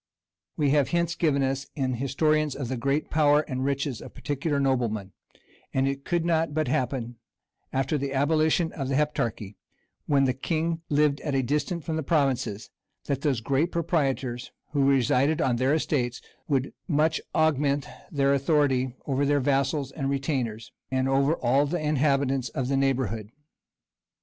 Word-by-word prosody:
We 145 -3 +2
have 145 -2 +3
hints 170 -1 0
given 145 -5 +1
us 135 +1 -1
in 130 -3 -1
historians 150 +3 +1
of 135 -4 -4
the 130 - -1
great 140 +5 -1
power 150 -1 +4
and 130 -4 -4
riches 140 -2 -1
of - - -11
particular 145 +1 -2
noblemen; 120 -7 0 0.6
and 135 0 +2
it 140 0 -3
could 175 -1 0
not 160 -3 +1
but 155 -2 +1
happen, 120 -2 -2 0.5
after 135 +3 0
the 140 0 -3
abolition 155 +4 +2
of 135 -4 -4
the 135 - 0
Heptarchy, 115 -9 -1 0.5
when 140 -2 +3
the 130 -1 +2
king 165 +4 -2
lived 145 -1 +2
at 145 -3 -2
a 135 - +2
distance 150 +5 -1
from 160 -1 -2
the - - -1
provinces, 135 -9 0 0.3
that 140 -1 -2
those 140 -7 0
great 140 +8 +1
proprietors, 135 -7 -1 0.2
who 140 -2 +3
resided 135 +3 +3
on 125 -2 +1
their 130 +4 +2
estates, 125 -6 -1 0.3
would 135 -3 0
much 155 -1 +2
augment 145 -2 +2 0.3
their 140 -1 +2
authority 135 -3 +1
over 140 0 0
their 145 0 +3
vassals 135 +1 0
and 135 -3 -3
retainers, 130 -5 -2 0.2
and 130 0 0
over 135 +3 +2
all 135 +3 +2
the 175 +5 -1
inhabitants 140 -3 +1
of 130 -1 -3
the 140 - +1
neighborhood. 125 -6 0
140 Hz, 160 wpm, -26 LUFS, 130-150 Hz, 0.6 s, power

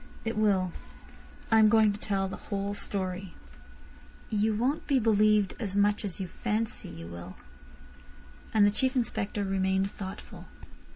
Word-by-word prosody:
"It 225 - -1
will. 195 -4 +2 0.8
I 225 - +6
am 215 -1 +7
going 220 -1 +5
to 205 - -8
tell 195 -2 -1
the 190 - -5
whole 200 0 -4
story." 190 -2 -4 1.0
"You 215 0 +1
won't 255 +8 -1
be 275 - +3
believed 215 -3 +3
as 200 -4 -3
much 205 +1 +3
as 200 -3 -4
you 190 - -2
fancy 215 +5 -3
you 85 0 -9
will." 85 +2 -9 1.2
And 215 -2 +5
the 205 - +4
Chief 260 +5 +1
Inspector 210 -4 -1
remained 190 0 0
thoughtful. 190 -1 -8
205 Hz, 150 wpm, -29 LUFS, 190-215 Hz, 1.2 s, am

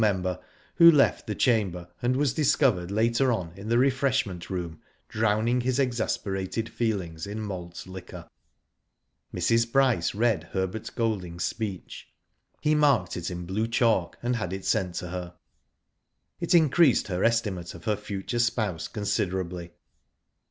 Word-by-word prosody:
member, 95 -4 0 0.4
who 170 0 +10
left 150 -4 +3
the - - -2
chamber, 95 -8 +1
and 125 +1 +1
was 140 -3 +1
discovered 130 - +2
later 115 +5 +2
on 90 -8 -3
in 100 +3 -8
the 120 - +3
refreshment 130 -8 +1
room 85 -4 -5 0.3
drowning 110 +3 +1
his 125 +1 0
exasperated 115 -5 -1
feelings 100 -8 -3
in 105 +2 -5
malt 90 -5 -6
liquor. 95 -1 -9 1.0
Mrs. 115 0 +1
Bryce 125 -11 +2
read 110 -6 +1
Herbert 95 +4 -2
Golding's 95 -7 -2
speech. 105 -5 -5 0.5
He 150 - +2
marked 140 -11 +3
it 85 0 -3
in 90 -1 -5
blue 105 +5 -1
chalk, 115 -1 +1
and 120 0 0
had 95 -5 -3
it 95 0 -6
sent 90 -2 0
to 90 - -4
her. 90 0 -6 1.0
It 170 0 +1
increased 160 -4 +4
her 90 0 -1
estimate 105 -8 0
of 85 - -12
her 105 -2 +2
future 105 +3 -4
spouse, 110 -8 0
considerably. 95 -4 -2
105 Hz, 140 wpm, -27 LUFS, 90-120 Hz, 1.0 s, who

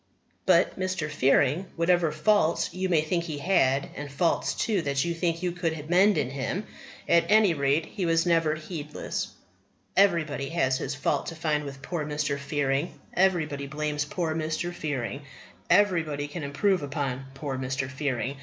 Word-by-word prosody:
But - - +4
Mr. 185 -5 -2
Fearing, 140 +6 +2
whatever 170 -1 +2
faults 165 +2 +2
you 185 +1 -2
may 165 -4 +4
think 170 +2 -1
he 155 -3 -4
had 140 -5 +2
and 145 -1 -6
faults, 165 +4 +1
too, 210 -5 0
that 140 0 0
you 170 - -1
think 165 0 -1
you 180 - +1
could 165 -3 -3
mend 195 +3 +5
in 125 - 0
him 140 +9 -3 0.4
at 170 0 +3
any 210 -4 +5
rate, 140 +2 +1
he 190 -5 -3
was 165 +1 +3
never 165 -3 +2
heedless. 155 -1 -5 0.7
Everybody 155 -8 +2
has 130 -6 +1
his 140 +1 -3
fault 140 - -1
to 165 - -5
find 155 -2 -1
with 135 -1 -8
poor 170 -1 -3
Mr. 150 -1 -2
Fearing. 140 +1 -1
Everybody 160 -7 +1
blames 150 0 -2
poor 160 +1 -2
Mr. 160 +2 -2
Fearing. 145 -5 -3 0.5
Everybody 170 -7 +2
can 155 +3 -6
improve 165 +7 +1
upon 140 -2 -3
poor 140 -1 -4
Mr. 130 0 -2
Fearing. 135 -1 -2
155 Hz, 165 wpm, -27 LUFS, 140-175 Hz, 0.7 s, mend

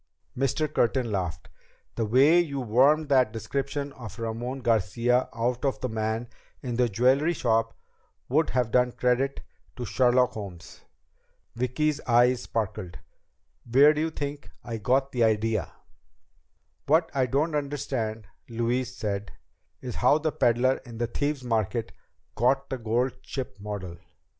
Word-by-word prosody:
Mr. 135 +4 0
Curtin 120 -1 +1
laughed. 85 -6 -3 0.5
"The 115 - -2
way 140 +9 +5
you 145 -5 -1
wormed 135 +6 +3
that 130 -5 +4
description 140 +5 -3
of 120 -3 -10
Ramon 120 +3 -4
Garcia 120 +3 +1
out 120 +3 -2
of 135 -2 0
the 130 - -3
man 110 +1 -2 0.4
in 125 -2 -3
the 125 0 +2
jewelry 130 - +3
shop 115 -5 0 0.5
would 155 +5 +2
have 125 -3 0
done 125 0 +3
credit 125 +2 0 0.3
to 125 - -5
Sherlock 125 +2 +3
Holmes." 95 -5 -9 0.7
Vicki's 140 +5 0
eyes 120 +1 +4
sparkled. 95 -7 -4 0.7
"Where 140 +5 +7
do 155 - -2
you 160 - 0
think 145 -2 -6
I 115 -1 -4
got 130 +6 +1
the 120 -2 +1
idea?" 110 -3 +1 1.2
"What 160 +3 +3
I 130 -2 +1
don't 150 +6 0
understand," 135 -7 -3 0.2
Louise 120 +2 -1
said, 100 -1 -3 0.5
"is 125 -2 -5
how 125 +4 +4
the 155 0 -1
peddler 125 +1 +2
in 120 -3 -10
the 120 - 0
Thieves' 145 +3 -2
Market 115 -1 -1 0.4
got 135 +4 +1
the 130 - -2
gold 120 +3 0
ship 130 -7 -6
model. 100 -4 -6
125 Hz, 140 wpm, -27 LUFS, 115-135 Hz, 1.2 s, Where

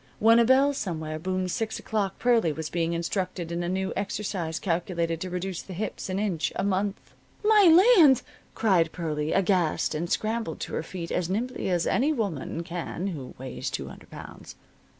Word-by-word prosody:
When 225 +2 +6
a 235 - +5
bell 270 +3 +4
somewhere 160 - -4
boomed 185 +1 -2
six 220 +3 -2
o'clock 205 -3 -2
Pearlie 235 -9 +3
was 155 +1 -5
being 170 -1 0
instructed 170 0 -3
in 170 +1 -2
a 175 - -2
new 190 +1 -1
exercise 190 -5 -3
calculated 170 -2 -1
to 185 - -3
reduce 180 0 -3
the 185 - -9
hips 210 0 -4
an 185 - -1
inch 195 -6 -1
a - - -1
month. 195 +1 -2 0.3
"My 415 0 +7
land!" 285 -7 +6 0.3
cried 180 -7 +3
Pearlie, 155 -3 -2
aghast, 185 -4 +1
and 170 +3 -3
scrambled 220 -5 -1
to - - -5
her - - -1
feet 170 +1 -7
as 175 -1 -1
nimbly 235 +3 -2
as 175 -2 +1
any 280 +5 +2
woman 190 - -3
can 175 0 -5
who 140 -8 -7
weighs 130 +1 -5
two - - -5
hundred - - -13
pounds. - - -10
185 Hz, 180 wpm, -27 LUFS, 170-215 Hz, 0.3 s, My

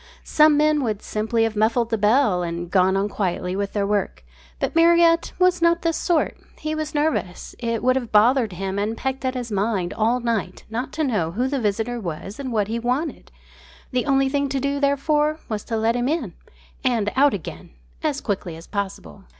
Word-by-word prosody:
Some 305 -1 +4
men 300 -1 +3
would 215 -4 -2
simply 220 +2 0
have 225 -1 -1
muffled 225 +2 +1
the - - +3
bell 210 -3 +3
and 170 0 -4
gone 190 0 +3
on 195 +1 +1
quietly 185 -3 -2
with 200 0 -3
their 205 -1 0
work. 200 - -2 0.3
But - - -2
Marriott 335 0 +4
was 365 -1 +3
not 335 0 +3
this 330 -1 +1
sort. 335 -1 0 0.2
He 310 0 -3
was 310 -1 -4
nervous. 290 - -1
It 230 -1 -2
would 255 +1 +3
have 245 -4 -3
bothered 225 +2 +4
and 200 +4 -2
pecked 265 0 -3
at 260 0 -1
his 245 -2 -4
mind 200 -3 -1
all 230 +3 +1
night 225 -6 -2
long 230 +2 -1
not 260 - -10
to 315 - -1
know 205 - 0
who 245 +6 0
the 275 0 -1
visitor 225 +3 -1
was 190 - -6
and 265 -2 -4
what 210 -3 +1
he 230 +2 -2
wanted. 255 +7 -2 0.6
The 255 +2 -1
only 270 -1 +3
thing 280 0 0
to 270 0 -1
do, 280 +1 -1
therefore, 295 +2 +1
was 215 -2 -3
to 225 - -2
let 225 +2 +1
him 245 0 0
in 280 - -2 0.5
and 230 -6 +1
out 280 -2 +4
again 180 - -8 0.3
as 290 -2 -1
quickly 190 -5 -3
as 165 +1 -11
possible. 190 - -5
235 Hz, 200 wpm, -22 LUFS, 205-280 Hz, 0.6 s, Some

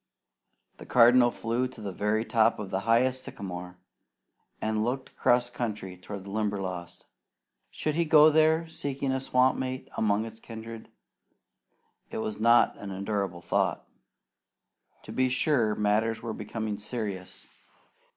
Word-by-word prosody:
The - - -12
Cardinal 120 0 +6
flew 120 +2 -1
to 125 -2 -13
the 105 -2 -5
very 105 +4 0
top 115 0 +3
of 105 -3 -6
the 95 - 0
highest 130 +3 +3
sycamore 90 -1 -7 0.8
and 110 0 0
looked 130 +3 -2
across 120 0 +2
country 105 -7 -4
toward 95 +2 -8
the 100 - -9
Limberlost. 95 -5 -3 0.6
Should 155 - -2
he 170 +3 +1
go 155 -1 +7
there 160 +1 +3
seeking 140 -3 -3
a 130 0 -1
swamp 130 0 +2
mate 130 0 -4
among 105 0 +1
his 110 0 -9
kindred? 115 0 -9 1.2
It - - -6
was 110 -1 -3
not 115 +2 +5
an 100 - -7
endurable 95 -2 -3
thought. 85 - 0 1.2
To - - -9
be 130 0 +1
sure, 125 -5 +2
matters 110 +2 +1
were 115 -2 -3
becoming 105 0 -4
serious. 105 -4 -5
110 Hz, 140 wpm, -28 LUFS, 105-125 Hz, 1.2 s, go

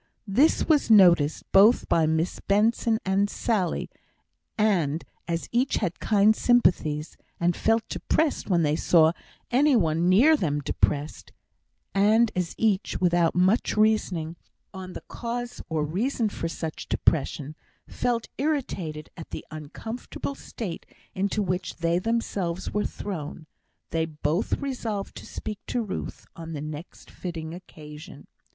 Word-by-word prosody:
This 245 +10 +3
was 300 -6 +3
noticed 175 -8 +5
both 210 +5 +6
by 160 -2 +3
Miss 160 +2 0
Benson 220 +2 +2
and 195 +2 +2
Sally, 200 -8 -1 0.7
and 170 -8 +1 0.2
as 170 -1 -2
each 250 +3 +1
had 180 -5 -2
keen 210 0 +4
sympathies, 170 -11 +2 0.2
and 170 0 +2
felt 225 0 +1
depressed 315 -7 -1
when 175 -3 +3
they 150 0 +2
saw 160 -1 +4 0.4
any 275 +3 +4
one 170 -4 +2
near 255 +13 +6
them 150 - -1
depressed, 145 +1 -2 0.6
and 215 +3 +4
as 180 -2 -2
each, 215 -3 0
without 175 -2 +2
much 185 +5 +2
reasoning 185 -7 +1 0.4
on 185 -1 -8
the - - -8
cause 240 +1 -5
or 155 -2 0
reason 220 - -1
for 165 - -4
such 160 -1 -5
depression, 150 -1 0 0.3
felt 235 -2 -1
irritated 195 - -2
at 165 - -10
the - - -7
uncomfortable 220 - -6
state 215 -9 -7 0.3
into 200 +2 0
which 180 -1 -2
they 170 +1 +1
themselves 190 -5 -2
were 210 - 0
thrown, 160 -5 -6 0.5
they 165 -1 +1
both 155 +4 -2
resolved 230 -8 -3
to - - -10
speak 210 -2 -6
to 245 - -1
Ruth 205 - -6
on 165 0 -7
the 145 - -5
next 155 +2 -8
fitting 165 -3 -6
occasion. 155 -2 -11
185 Hz, 135 wpm, -26 LUFS, 160-220 Hz, 0.7 s, both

